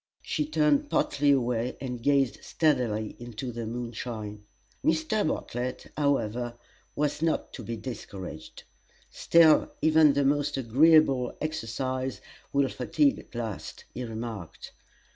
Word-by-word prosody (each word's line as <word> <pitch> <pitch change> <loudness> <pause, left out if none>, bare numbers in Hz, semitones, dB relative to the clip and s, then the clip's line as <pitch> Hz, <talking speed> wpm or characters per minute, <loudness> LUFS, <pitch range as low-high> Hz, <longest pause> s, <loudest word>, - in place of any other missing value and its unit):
She 150 -1 -1
turned 150 -2 +2
partly 145 0 +1
away, 125 -3 +1
and 125 -3 -5
gazed 135 -4 +2
steadily 120 -9 0
into 120 +1 -6
the 115 -1 -5
moonshine. 115 -3 -5 0.4
Mr. 160 +5 +1
Bartlett, 125 -4 -4
however, 120 -5 0 0.4
was 150 0 -1
not 165 -1 0
to 120 - -7
be 115 +2 -4
discouraged. 100 -7 -8 0.5
"Still, 165 -2 +5
even 155 -2 +5
the 140 0 +1
most 145 0 +1
agreeable 135 0 +4
exercise 130 -2 -3 0.3
will 140 -1 +3
fatigue 280 - +1
at - - -15
last," 115 -5 -5
he 125 - -4
remarked. 110 -6 -7
130 Hz, 120 wpm, -28 LUFS, 115-150 Hz, 0.5 s, Still